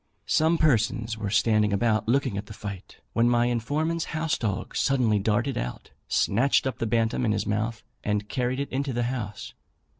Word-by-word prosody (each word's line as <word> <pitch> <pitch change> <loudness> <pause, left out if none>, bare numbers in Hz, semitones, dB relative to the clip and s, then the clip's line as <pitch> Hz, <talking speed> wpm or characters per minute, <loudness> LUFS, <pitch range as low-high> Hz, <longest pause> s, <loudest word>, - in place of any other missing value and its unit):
Some 160 +2 +3
persons 115 -6 +1
were 105 -2 -4
standing 110 0 +3
about 110 +1 +1
looking 130 -2 +1
at 100 +1 -4
the 105 - -9
fight, 100 -1 -8 0.2
when 115 +1 +3
my 120 0 +3
informant's 150 +8 -1
house 155 -1 -1
dog 105 -5 -3
suddenly 120 -6 +2
darted 120 +6 0
out, - - -6 0.2
snatched 125 +8 +2
up 130 - -3
the 115 - -1
bantam 115 +2 +1
in 110 -3 +2
his 105 0 -1
mouth, 110 +2 -2 0.2
and 105 0 -1
carried 125 +2 -1
it 140 - -3
into 135 0 -1
the 120 +1 0
house. 105 -5 -6
115 Hz, 180 wpm, -26 LUFS, 105-130 Hz, 0.2 s, Some